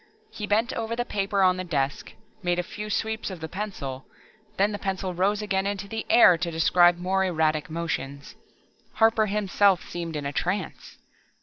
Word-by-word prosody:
He 210 - -6
bent 225 +5 +1
over 230 0 -3
the 240 +1 -2
paper 200 -2 0
on 185 0 +4
the 185 - -3
desk, 145 -5 -2 0.3
made 175 -2 0
a 180 - 0
few 210 +4 -7
sweeps 220 +1 -2
of 185 -3 -7
the 160 - -5
pencil, 155 -9 -5 0.5
then 200 +2 +3
the 205 - -4
pencil 190 -1 -3
rose 200 +4 +1
again 195 -1 0
into 200 -1 -3
the 220 +2 -5
air 180 -8 +7
to 175 - -1
describe 175 +2 +4
more 190 +2 0
erratic 160 -2 0
motions. 145 -4 -4 0.6
Harper 225 -1 +3
himself 200 -2 +2
seemed 170 -2 -5
in 145 -1 -4
a 140 - -3
trance. 180 +3 -3
185 Hz, 180 wpm, -26 LUFS, 170-210 Hz, 0.6 s, air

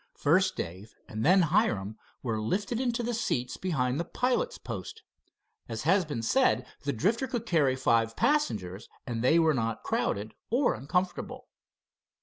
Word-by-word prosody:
First 185 +6 +3
Dave 95 +6 -6
and 110 +1 -4
then 185 +5 +5
Hiram 135 - +1 0.3
were 110 -4 -1
lifted 205 - -1
into 240 -1 0
the 240 +1 -1
seats 215 - -1
behind 135 -7 -1
the - - 0
pilot's 255 - -1
post. 450 - -7 0.7
As 115 -1 -4
has 185 +4 +3
been 145 -7 -4
said, 265 - +2 0.2
the 145 - -1
Drifter 210 - 0
could 240 -4 -3
carry 150 - +2
five 115 -3 +2
passengers, 105 - 0 0.2
and 115 -2 -3
they 160 +6 +5
were 160 -2 +4
not 115 -4 -2
crowded 105 +2 -1 0.2
or 245 +4 +2
uncomfortable. 180 +6 -3
155 Hz, 150 wpm, -29 LUFS, -, 0.7 s, then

